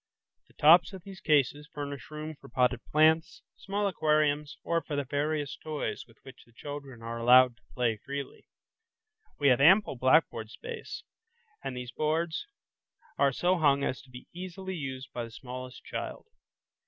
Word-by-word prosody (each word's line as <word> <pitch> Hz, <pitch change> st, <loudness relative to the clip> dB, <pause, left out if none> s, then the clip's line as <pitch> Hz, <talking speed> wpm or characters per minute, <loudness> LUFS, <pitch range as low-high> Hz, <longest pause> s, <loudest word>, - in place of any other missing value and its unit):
The -, -, -26 dB
tops 170 Hz, +6 st, +6 dB
of 190 Hz, -2 st, -9 dB
these 195 Hz, -2 st, -10 dB
cases 150 Hz, 0 st, +2 dB
furnish 140 Hz, -4 st, -6 dB
room 155 Hz, +1 st, -6 dB
for 145 Hz, -, -15 dB
potted 125 Hz, 0 st, +1 dB
plants, 160 Hz, +3 st, +3 dB
small 200 Hz, +1 st, -2 dB
aquariums, 150 Hz, -4 st, +1 dB
or 170 Hz, 0 st, 0 dB
for 150 Hz, -, -5 dB
the 145 Hz, -, 0 dB
various 145 Hz, +1 st, -2 dB
toys 155 Hz, -2 st, -4 dB
with 115 Hz, -, -21 dB
which 130 Hz, -, -13 dB
the 115 Hz, -, -25 dB
children 140 Hz, -3 st, -8 dB
are 115 Hz, 0 st, -5 dB
allowed 125 Hz, +1 st, +6 dB
to 120 Hz, -, -31 dB
play 120 Hz, -3 st, +1 dB
freely. 140 Hz, +4 st, -7 dB, 0.9 s
We 145 Hz, -1 st, +4 dB
have 125 Hz, +1 st, +4 dB
ample 190 Hz, +2 st, +6 dB
blackboard 130 Hz, -3 st, +2 dB
space, 470 Hz, -, -8 dB, 0.6 s
and 125 Hz, -, -4 dB
these 125 Hz, 0 st, -6 dB
boards 160 Hz, -, -1 dB, 0.7 s
are 140 Hz, -1 st, +4 dB
so 180 Hz, +6 st, +1 dB
hung 140 Hz, -3 st, +3 dB
as 130 Hz, -, -2 dB
to 130 Hz, -, -20 dB
be 125 Hz, 0 st, -11 dB
easily 185 Hz, +2 st, -6 dB
used 135 Hz, -4 st, -6 dB
by 120 Hz, -, -3 dB
the 115 Hz, -, -7 dB
smallest 125 Hz, +2 st, -9 dB
child. -, -, -6 dB
145 Hz, 165 wpm, -29 LUFS, 130-160 Hz, 0.9 s, tops